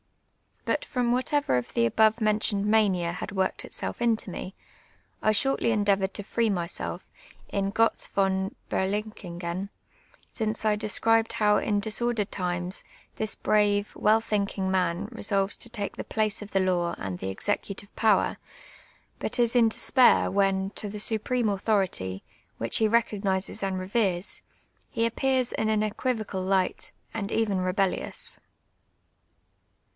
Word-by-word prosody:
IJut -, -, 0 dB
from 245 Hz, -3 st, 0 dB
whatever 255 Hz, -, +1 dB
of 125 Hz, -, -4 dB
the 115 Hz, -, +4 dB
above 220 Hz, -, +3 dB
men 215 Hz, 0 st, +3 dB
tioned 205 Hz, -2 st, 0 dB
mania 200 Hz, -5 st, +3 dB
had 175 Hz, -, -5 dB
worked 190 Hz, -1 st, -1 dB
itself -, -, -5 dB
into 225 Hz, -4 st, +1 dB
me, 185 Hz, +2 st, -6 dB, 0.7 s
I 215 Hz, -, +3 dB
shortly 235 Hz, +2 st, +1 dB
endeavoured 200 Hz, -3 st, +2 dB
to 205 Hz, -, -3 dB
free 230 Hz, +2 st, 0 dB
myself 175 Hz, -4 st, -3 dB, 0.5 s
in 195 Hz, 0 st, -1 dB
(jotz 225 Hz, +2 st, +2 dB
von 190 Hz, 0 st, 0 dB, 0.2 s
JJeriic/n'fi(/en, 190 Hz, -2 st, -3 dB, 0.6 s
since 220 Hz, -1 st, -2 dB
I 215 Hz, -1 st, +4 dB
descrilx'd 225 Hz, +2 st, +2 dB
how 210 Hz, -1 st, +3 dB
in 205 Hz, -1 st, +1 dB
disordered 220 Hz, 0 st, -1 dB
times 180 Hz, 0 st, -3 dB, 0.3 s
this 220 Hz, 0 st, -1 dB
brave, 205 Hz, -1 st, +2 dB
well 215 Hz, +1 st, +4 dB
thinkin*^ 200 Hz, -3 st, -1 dB
man 180 Hz, +1 st, 0 dB
resolves 200 Hz, -1 st, 0 dB
to 235 Hz, -, -7 dB
take 205 Hz, -3 st, -4 dB
the -, -, -3 dB
place 215 Hz, -1 st, -1 dB
of 210 Hz, -, -8 dB
the 195 Hz, -, +2 dB
law 180 Hz, -2 st, +1 dB
and 95 Hz, -2 st, -5 dB
the 95 Hz, -, -3 dB
executive 200 Hz, -, -2 dB
])ower, 215 Hz, -4 st, +3 dB, 0.8 s
but -, -, -2 dB
is 240 Hz, 0 st, +2 dB
in 230 Hz, -2 st, +6 dB
despair 250 Hz, +3 st, +4 dB
when, 195 Hz, 0 st, +1 dB
to 210 Hz, -, -6 dB
the 210 Hz, +1 st, -6 dB
supreme 225 Hz, +2 st, 0 dB
authority, 190 Hz, -, 0 dB, 0.3 s
which 115 Hz, 0 st, 0 dB
he 220 Hz, -, +3 dB
recogni.ses 210 Hz, -3 st, 0 dB
and 195 Hz, -1 st, -1 dB
reveres, 185 Hz, -1 st, -1 dB, 0.5 s
he 230 Hz, 0 st, +1 dB
aj)pcais 255 Hz, +1 st, 0 dB
iu 220 Hz, -, +1 dB
an 215 Hz, -1 st, +2 dB
eijuivocid 220 Hz, +2 st, -1 dB, 0.2 s
bght, 190 Hz, -1 st, +1 dB, 0.2 s
and 205 Hz, -3 st, -3 dB
even 210 Hz, -4 st, +1 dB
rebellious. 185 Hz, +1 st, -1 dB
205 Hz, 140 wpm, -27 LUFS, 190-220 Hz, 0.8 s, in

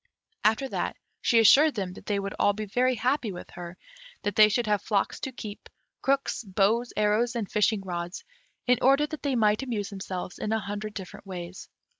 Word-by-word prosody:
After 220 Hz, +6 st, +3 dB
that, -, -, -2 dB, 0.2 s
she 235 Hz, -, +3 dB
assured 280 Hz, +7 st, +7 dB
them 190 Hz, -4 st, -3 dB
that -, -, -13 dB
they 205 Hz, -, +1 dB
would 195 Hz, 0 st, -3 dB
be -, -, -8 dB
all 205 Hz, -, +4 dB
very 245 Hz, +5 st, 0 dB
happy 245 Hz, 0 st, 0 dB
with 180 Hz, -, -9 dB
her; 175 Hz, 0 st, -8 dB, 0.5 s
that 205 Hz, -, -1 dB
they 215 Hz, 0 st, +8 dB
should 235 Hz, +3 st, +1 dB
have 210 Hz, -2 st, +1 dB
flocks 205 Hz, -3 st, 0 dB
to 265 Hz, -, -4 dB
keep, 215 Hz, -4 st, -9 dB, 0.3 s
crooks, 275 Hz, -2 st, 0 dB
bows, 210 Hz, +4 st, +1 dB
arrows, 215 Hz, +3 st, +2 dB
and 225 Hz, -4 st, -2 dB
fishing 210 Hz, 0 st, +2 dB
rods, 175 Hz, -1 st, -5 dB, 0.4 s
in 250 Hz, -1 st, +3 dB
order 275 Hz, +3 st, +5 dB
that 310 Hz, 0 st, -7 dB
they 280 Hz, -3 st, 0 dB
might 215 Hz, -1 st, +3 dB
amuse 225 Hz, -7 st, -3 dB
themselves 185 Hz, -2 st, -6 dB
in 215 Hz, -, -2 dB
a 220 Hz, -, +1 dB
hundred 205 Hz, +1 st, -5 dB
different 190 Hz, +1 st, -8 dB
ways. 180 Hz, -1 st, -7 dB
210 Hz, 195 wpm, -27 LUFS, 195-245 Hz, 0.5 s, they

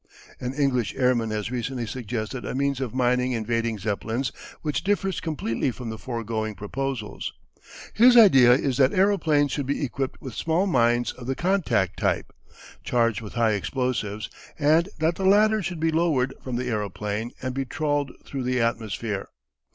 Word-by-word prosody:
An 125 Hz, +1 st, -4 dB
English 130 Hz, -6 st, 0 dB
airman 125 Hz, -3 st, +2 dB
has 105 Hz, +1 st, -3 dB
recently 125 Hz, 0 st, -3 dB
suggested 120 Hz, +1 st, -4 dB
a -, -, -4 dB
means 140 Hz, 0 st, 0 dB
of 125 Hz, -2 st, -4 dB
mining 125 Hz, 0 st, +2 dB
invading 115 Hz, 0 st, -1 dB
Zeppelins 110 Hz, +5 st, -2 dB, 0.3 s
which 150 Hz, -4 st, -1 dB
differs 195 Hz, -1 st, 0 dB
completely 140 Hz, -6 st, -2 dB
from 120 Hz, -2 st, -6 dB
the 110 Hz, -, -6 dB
foregoing 115 Hz, -3 st, -3 dB
proposals. 120 Hz, +1 st, -4 dB, 0.6 s
His 245 Hz, +3 st, +7 dB
idea 135 Hz, -, +8 dB
is 130 Hz, -1 st, +1 dB
that 135 Hz, -1 st, +4 dB
aeroplanes 165 Hz, -7 st, +3 dB
should 140 Hz, -2 st, -2 dB
be 140 Hz, +1 st, 0 dB
equipped 135 Hz, 0 st, -4 dB
with 130 Hz, -, -8 dB
small 165 Hz, -, +1 dB
mines 120 Hz, -8 st, +2 dB
of 125 Hz, -1 st, -11 dB
the 135 Hz, -, -1 dB
contact 155 Hz, -, +1 dB
type, -, -, 0 dB, 0.5 s
charged 115 Hz, -3 st, +1 dB
with 105 Hz, -, -8 dB
high 115 Hz, -2 st, +2 dB
explosives, 110 Hz, -1 st, -2 dB, 0.3 s
and 160 Hz, +5 st, +3 dB
that 160 Hz, +2 st, +1 dB
the 195 Hz, -, -3 dB
latter 215 Hz, +2 st, +5 dB
should 175 Hz, -2 st, -4 dB
be 160 Hz, +1 st, +1 dB
lowered 155 Hz, -6 st, +1 dB
from 130 Hz, -2 st, -4 dB
the 125 Hz, +1 st, -2 dB
aeroplane 105 Hz, 0 st, -2 dB
and 130 Hz, 0 st, -3 dB
be 135 Hz, +1 st, -1 dB
trawled 145 Hz, 0 st, -1 dB
through 135 Hz, -, -4 dB
the 125 Hz, 0 st, 0 dB
atmosphere. 110 Hz, -3 st, -2 dB
125 Hz, 165 wpm, -25 LUFS, 115-145 Hz, 0.6 s, idea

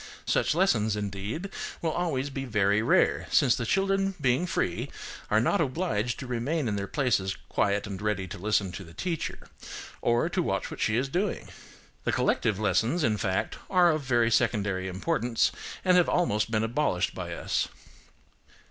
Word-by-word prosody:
Such -, -, +1 dB
lessons, 115 Hz, -, +2 dB
indeed, 105 Hz, -, -4 dB, 0.3 s
will 165 Hz, -, -1 dB
always 145 Hz, -6 st, -1 dB
be 135 Hz, 0 st, -4 dB
very 105 Hz, -4 st, +2 dB
rare, 115 Hz, -, +2 dB
since 125 Hz, -4 st, +4 dB
the 115 Hz, -, -3 dB
children 195 Hz, 0 st, +1 dB
being 135 Hz, +5 st, +2 dB
free 90 Hz, -, -1 dB, 0.4 s
are 105 Hz, -, +4 dB
not 145 Hz, -, +2 dB
obliged 130 Hz, -, -1 dB
to 135 Hz, -, -6 dB
remain 125 Hz, +4 st, -1 dB
in 105 Hz, -, -1 dB
their 100 Hz, -1 st, -3 dB
places 110 Hz, -9 st, 0 dB
quiet 100 Hz, +1 st, +1 dB
and 100 Hz, -2 st, -6 dB
ready 105 Hz, -3 st, -1 dB
to -, -, -7 dB
listen 100 Hz, -1 st, +1 dB
to 95 Hz, -, -7 dB
the 85 Hz, -1 st, -14 dB
teacher, 170 Hz, -3 st, -4 dB, 0.5 s
or 120 Hz, 0 st, +2 dB
to -, -, 0 dB
watch -, -, -2 dB
what -, -, -7 dB
she 110 Hz, -, +2 dB
is 130 Hz, +3 st, +1 dB
doing. 185 Hz, +8 st, -2 dB, 0.5 s
The -, -, +1 dB
collective 105 Hz, -, +1 dB
lessons, 110 Hz, -, +1 dB
in 110 Hz, -4 st, +2 dB
fact, 95 Hz, -4 st, -1 dB
are 180 Hz, -2 st, +5 dB
of 155 Hz, -1 st, -1 dB
very 120 Hz, -3 st, +2 dB
secondary 100 Hz, -5 st, +1 dB
importance, 120 Hz, -, 0 dB, 0.3 s
and 180 Hz, -1 st, +5 dB
have 175 Hz, -, +4 dB
been -, -, +1 dB
almost 110 Hz, -12 st, +1 dB
abolished 110 Hz, -2 st, 0 dB
by -, -, -5 dB
us. -, -, -1 dB
120 Hz, 170 wpm, -28 LUFS, 105-155 Hz, 0.5 s, are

